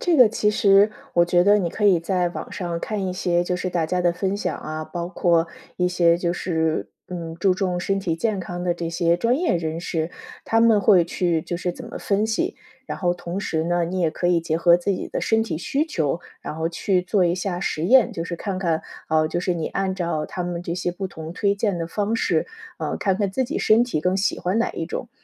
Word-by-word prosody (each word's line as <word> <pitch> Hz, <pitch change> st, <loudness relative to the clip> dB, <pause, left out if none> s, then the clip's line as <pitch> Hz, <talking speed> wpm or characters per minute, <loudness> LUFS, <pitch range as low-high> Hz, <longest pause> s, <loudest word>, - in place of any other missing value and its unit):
这 345 Hz, -3 st, +2 dB
个 250 Hz, -4 st, +8 dB
其 210 Hz, -1 st, +1 dB
实 200 Hz, 0 st, +5 dB, 0.2 s
我 170 Hz, 0 st, +4 dB
觉 175 Hz, 0 st, +3 dB
得 205 Hz, +1 st, +5 dB
你 175 Hz, -4 st, 0 dB
可 210 Hz, -, -3 dB
以 185 Hz, -5 st, +5 dB
在 180 Hz, 0 st, 0 dB
网 -, -, -7 dB
上 170 Hz, -3 st, -4 dB
看 205 Hz, -3 st, -2 dB
一 180 Hz, -, -2 dB
些 175 Hz, -1 st, +1 dB
就 180 Hz, -, -1 dB
是 185 Hz, +1 st, -2 dB
大 170 Hz, -2 st, 0 dB
家 180 Hz, +2 st, 0 dB
的 175 Hz, -1 st, +3 dB
分 190 Hz, +2 st, -1 dB
享 -, -, -2 dB
啊， 155 Hz, 0 st, -5 dB
包 170 Hz, 0 st, -5 dB
括 170 Hz, -3 st, +2 dB, 0.3 s
一 180 Hz, -, +1 dB
些 170 Hz, -2 st, +3 dB
就 175 Hz, -1 st, -1 dB
是， 160 Hz, -3 st, -1 dB, 0.2 s
嗯， 165 Hz, -2 st, -6 dB
注 190 Hz, +2 st, +3 dB
重 185 Hz, -2 st, -1 dB
身 195 Hz, +2 st, -1 dB
体 170 Hz, -4 st, -1 dB
健 210 Hz, +1 st, -1 dB
康 175 Hz, 0 st, -5 dB
的 175 Hz, -, +2 dB
这 170 Hz, -1 st, -4 dB
些 170 Hz, 0 st, +2 dB
专 240 Hz, +7 st, +2 dB
业 345 Hz, -, +1 dB
人 160 Hz, -1 st, -3 dB
士， 165 Hz, -1 st, -2 dB, 0.4 s
他 225 Hz, 0 st, +3 dB
们 225 Hz, -3 st, +5 dB
会 190 Hz, -5 st, +5 dB
去 170 Hz, -2 st, 0 dB
就 175 Hz, -, -4 dB
是 180 Hz, -, -1 dB
怎 -, -, -10 dB
么 -, -, -7 dB
分 205 Hz, +2 st, +1 dB
析。 220 Hz, 0 st, -1 dB, 0.3 s
然 -, -, -4 dB
后 175 Hz, -2 st, +1 dB
同 175 Hz, +1 st, -5 dB
时 160 Hz, -5 st, -1 dB
呢， 175 Hz, 0 st, +1 dB
你 185 Hz, +2 st, -3 dB
也 165 Hz, -3 st, +2 dB
可 175 Hz, -, -2 dB
以 175 Hz, -1 st, +3 dB
结 165 Hz, -1 st, -1 dB
合 170 Hz, +1 st, +5 dB
自 175 Hz, -, -1 dB
己 -, -, -4 dB
的 -, -, -3 dB
身 225 Hz, 0 st, +2 dB
体 165 Hz, -8 st, -3 dB
需 280 Hz, -, 0 dB
求， 165 Hz, -, -1 dB, 0.2 s
然 155 Hz, -, -6 dB
后 160 Hz, 0 st, -1 dB
去 180 Hz, +2 st, 0 dB
做 185 Hz, +1 st, +1 dB
一 175 Hz, 0 st, +2 dB
下 180 Hz, -1 st, -3 dB
实 160 Hz, -2 st, -2 dB
验， 255 Hz, +3 st, +5 dB
就 165 Hz, -, -4 dB
是 170 Hz, -, -4 dB
看 190 Hz, +1 st, -4 dB
看， 165 Hz, -4 st, 0 dB, 0.3 s
哦， 155 Hz, 0 st, +3 dB
就 175 Hz, -, -2 dB
是 180 Hz, 0 st, 0 dB
你 165 Hz, -2 st, -2 dB
按 190 Hz, -1 st, -1 dB
照 170 Hz, -4 st, -2 dB
他 180 Hz, -, -4 dB
们 175 Hz, -1 st, -4 dB
这 170 Hz, -1 st, -3 dB
些 180 Hz, 0 st, -1 dB
不 190 Hz, +2 st, -4 dB
同 160 Hz, -2 st, -8 dB
推 200 Hz, +1 st, +1 dB
荐 200 Hz, -2 st, 0 dB
的 165 Hz, -1 st, -3 dB
方 210 Hz, +5 st, -1 dB
式， -, -, +1 dB, 0.3 s
呃， -, -, -2 dB
看 195 Hz, -2 st, +1 dB
看 200 Hz, 0 st, -1 dB
自 260 Hz, +6 st, 0 dB
己 280 Hz, +6 st, -3 dB
身 225 Hz, +3 st, +4 dB
体 230 Hz, -11 st, -2 dB
更 180 Hz, +4 st, +1 dB
喜 195 Hz, -, 0 dB
欢 185 Hz, +5 st, 0 dB
哪 230 Hz, -, +1 dB
一 -, -, -4 dB
种。 -, -, -5 dB
180 Hz, 270 characters per minute, -23 LUFS, 170-200 Hz, 0.4 s, 个